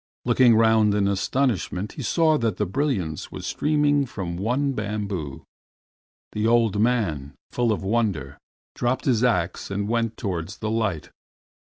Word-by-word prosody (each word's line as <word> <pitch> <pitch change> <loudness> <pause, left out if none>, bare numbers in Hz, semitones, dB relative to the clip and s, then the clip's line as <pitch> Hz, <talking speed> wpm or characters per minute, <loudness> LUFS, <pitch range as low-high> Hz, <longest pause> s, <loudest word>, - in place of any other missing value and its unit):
Looking 120 -1 +5
round 110 -2 +4
in 100 -1 +2
astonishment, 100 - -1
he - - -8
saw 160 +5 +2
that 115 -5 -1
the 105 - 0
brilliance 95 - -2
was - - -7
streaming 145 -2 +1
from 90 -7 -5
one 125 +9 0
bamboo. 100 - -4 0.9
The 105 +1 -1
old 115 -3 +3
man, 95 - 0 0.2
full 120 -2 +1
of 105 - -2
wonder, 95 - -1 0.3
dropped 125 +6 -1
his 125 -4 +2
ax 90 -8 0
and 100 +1 -2
went 115 0 -1
towards 95 -1 -4
the 110 -1 -3
light. 110 -8 -2
110 Hz, 145 wpm, -24 LUFS, 95-120 Hz, 0.9 s, Looking